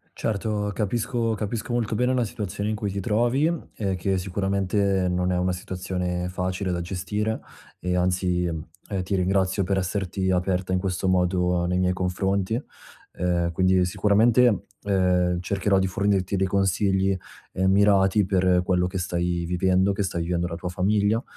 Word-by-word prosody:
Certo, 105 -1 -2
capisco 115 +2 -1
capisco 110 +2 -4
molto 115 -2 0
bene 125 +3 +1
la 125 -2 +1
situazione 100 0 -4
in 110 - -1
cui 105 -2 -3
ti 100 - -3
trovi 120 - +2 0.3
e 95 -3 -1
che 95 +2 0
sicuramente 95 0 0
non 90 +1 0
è 90 - +1
una 90 0 +1
situazione 90 -1 -3
facile 90 +1 -2
da 85 - -2
gestire 105 +5 -2 0.4
e, 90 0 -1
anzi, 90 0 +1
ehm, 80 -2 -4 0.4
ti 95 +2 -1
ringrazio 95 +1 +1
per 95 +2 0
esserti 95 0 -1
aperta 90 0 0
in 90 - +2
questo 95 0 -2
modo 90 -1 +2
nei 90 +1 0
miei 90 0 +2
confronti. 95 +5 -1 0.5
Uhm, 85 -1 0
quindi, 95 +1 +3
sicuramente, 110 +4 +3 0.2
uhm, 90 -3 +2
cercherò 95 +1 +1
di 95 - +1
fornirti 100 0 0
dei 95 0 +1
consigli, 95 0 +1 0.4
uhm, 95 +1 +2
mirati 100 0 +4
per 90 -1 +2
quello 90 -1 +2
che 95 - -4
stai 85 -1 -1
vivendo, 95 +2 +2
che 100 - -1
stai 85 -3 -2
vivendo 85 0 -1
la 85 - -5
tua 90 - -6
famiglia. 105 +5 +1
95 Hz, 160 wpm, -25 LUFS, 90-100 Hz, 0.5 s, mirati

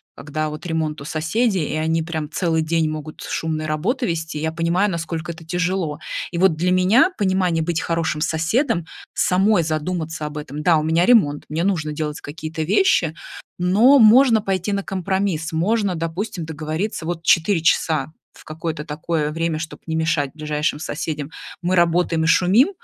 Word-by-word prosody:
когда 155 +2 -3
вот 155 +3 -8
ремонт 155 -2 -2
у 140 - -8
соседей 170 +4 0
и - - -2
они 160 +1 0
прям 160 -2 -4
целый 160 -1 0
день 160 0 +1
могут 155 0 -6
шумные 155 -1 -3
работы 210 - -1
вести, 160 -3 -3
я 160 +1 -1
понимаю, 170 +5 +1
насколько 165 0 -4
это 165 0 -11
тяжело. 175 -2 -1 0.3
И 170 - -4
вот 185 -3 +4
для 175 +3 0
меня 205 - +4
понимание 185 -4 +1
быть 170 0 -1
хорошим 165 -2 -1
соседом- 165 - 0 0.3
самой 190 0 +3
задуматься 160 0 -3
об 150 0 -7
этом. 150 0 -6
Да, 165 0 +4
у 155 - 0
меня 160 +2 +2
ремонт, 165 -12 +3
мне 160 +2 -1
нужно 160 -6 0
делать 150 -1 -4
какие-то 155 +2 -6
вещи, 170 - +2 0.4
но 210 +10 +5
можно 230 +1 +6
пойти 195 0 -1
на 200 0 -1
компромисс. 190 -3 -2
Можно, 195 +4 +1
допустим, 170 +3 -4
договориться: 160 +4 -4
вот 170 -1 -3
4 170 +1 +3
часа 160 -1 +1 0.2
в - - -16
какое-то 155 0 -5
такое 150 0 -2
время, 165 0 -1
чтоб 160 0 -6
не 160 - -2
мешать 160 -3 0
ближайшим 150 -1 -1
соседям, 150 -1 -4 0.3
мы 180 +2 +1
работаем 170 -1 +2
и - - +1
шумим, 190 - +4
165 Hz, 170 wpm, -21 LUFS, 155-185 Hz, 0.4 s, можно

